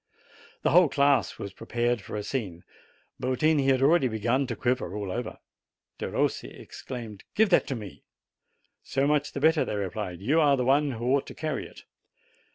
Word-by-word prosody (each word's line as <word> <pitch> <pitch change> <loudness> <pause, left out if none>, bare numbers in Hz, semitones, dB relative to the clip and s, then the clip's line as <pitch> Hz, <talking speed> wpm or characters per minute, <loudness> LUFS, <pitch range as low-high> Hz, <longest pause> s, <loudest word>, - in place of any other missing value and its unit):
The - - +2
whole 175 0 +6
class 140 -1 +2
was 100 - -7
prepared 120 -1 -1
for - - -8
a 105 - -3
scene. 100 -8 -4 0.6
Yotini 140 +2 +2
had 135 -1 +3
already 145 -1 +4
begun 120 +4 0
to 120 - -3
quiver 125 +2 -1
all 100 -3 -4
over. 120 +2 -4 0.6
Perossi - - -2
ex - - -11
claimed: 115 -6 -7
'\iive 220 0 +4
that 180 - +3
to 135 - -2
me!" 105 -4 -9 0.8
"So 135 - -1
much 150 0 +1
the - - -3
better, 160 +2 +4
thev 105 - -3
replied; 100 -2 -4
"vou 135 - +2
are 145 -3 +5
ttie - - -5
w - - 0
M - - 0
one 140 +2 +3
\\ 120 - -6
ho 120 - -5
ought 140 - -1
to - - -9
carrv 155 -3 -3
it." - - -15
130 Hz, 195 wpm, -27 LUFS, 110-145 Hz, 0.8 s, whole